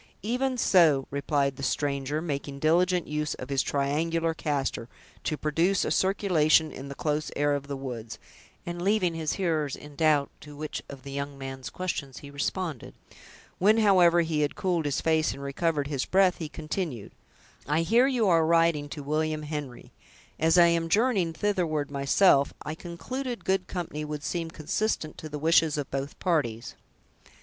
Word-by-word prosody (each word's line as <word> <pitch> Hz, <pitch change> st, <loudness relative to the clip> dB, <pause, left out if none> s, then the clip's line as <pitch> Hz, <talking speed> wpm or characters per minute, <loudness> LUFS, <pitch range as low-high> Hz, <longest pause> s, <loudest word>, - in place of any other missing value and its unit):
"Even 250 Hz, +4 st, 0 dB
so," 160 Hz, -, +4 dB
replied 140 Hz, -1 st, 0 dB
the -, -, -7 dB
stranger, 140 Hz, +2 st, -1 dB
making 140 Hz, -3 st, -4 dB
diligent 175 Hz, +4 st, +2 dB
use 150 Hz, 0 st, -2 dB
of 130 Hz, -, -8 dB
his 135 Hz, -1 st, +2 dB
triangular 165 Hz, +4 st, 0 dB
castor, 140 Hz, -7 st, -2 dB, 0.3 s
to 155 Hz, -, -1 dB
produce 165 Hz, +6 st, +1 dB
a -, -, -1 dB
circulation 165 Hz, -5 st, +3 dB
in 135 Hz, +1 st, -8 dB
the 140 Hz, -, -7 dB
close 150 Hz, 0 st, -1 dB
air 145 Hz, 0 st, +2 dB
of 140 Hz, 0 st, -3 dB
the 140 Hz, -1 st, -4 dB
woods, 120 Hz, -5 st, -6 dB, 0.5 s
and 175 Hz, 0 st, -5 dB
leaving 190 Hz, -2 st, +2 dB
his 160 Hz, -2 st, -2 dB
hearers 160 Hz, -7 st, -1 dB
in 150 Hz, -1 st, -12 dB
doubt 150 Hz, -2 st, +2 dB
to 145 Hz, 0 st, -11 dB
which 155 Hz, +1 st, -5 dB
of 140 Hz, -2 st, -10 dB
the 140 Hz, -, -8 dB
young 140 Hz, 0 st, -4 dB
man's 135 Hz, -1 st, -6 dB
questions 155 Hz, -7 st, -4 dB
he 140 Hz, -, -10 dB
responded; 155 Hz, 0 st, -3 dB, 0.6 s
when, 210 Hz, +4 st, +5 dB
however, 180 Hz, -5 st, +5 dB
he 160 Hz, -2 st, 0 dB
had 145 Hz, -, 0 dB
cooled 175 Hz, -4 st, 0 dB
his 145 Hz, -2 st, 0 dB
face, 160 Hz, -1 st, +2 dB
and 140 Hz, -, -9 dB
recovered 145 Hz, +1 st, -1 dB
his 140 Hz, -2 st, -2 dB
breath, 190 Hz, -1 st, +3 dB
he 160 Hz, -3 st, -4 dB
continued, 155 Hz, -, -4 dB, 0.6 s
"I 150 Hz, +3 st, +2 dB
hear 235 Hz, +9 st, +4 dB
you 245 Hz, -6 st, +1 dB
are 165 Hz, -3 st, +4 dB
riding 165 Hz, -3 st, +2 dB
to 145 Hz, 0 st, -7 dB
William 155 Hz, +1 st, -1 dB
Henry; 150 Hz, -4 st, -6 dB, 0.5 s
as 165 Hz, +2 st, +3 dB
I 175 Hz, -, +8 dB
am 170 Hz, -1 st, +1 dB
journeying 200 Hz, -5 st, +2 dB
thitherward 160 Hz, -7 st, -1 dB
myself, 140 Hz, +1 st, +3 dB
I 150 Hz, -, -4 dB
concluded 230 Hz, +11 st, -6 dB
good 190 Hz, -1 st, +1 dB
company 165 Hz, -4 st, -4 dB
would 150 Hz, -1 st, -5 dB
seem 165 Hz, 0 st, -2 dB
consistent 160 Hz, +1 st, -2 dB
to 155 Hz, -, -7 dB
the 150 Hz, -, -5 dB
wishes 160 Hz, 0 st, +3 dB
of 145 Hz, -2 st, -4 dB
both 135 Hz, +1 st, -4 dB
parties." 130 Hz, -, -1 dB
155 Hz, 170 wpm, -27 LUFS, 140-175 Hz, 0.6 s, I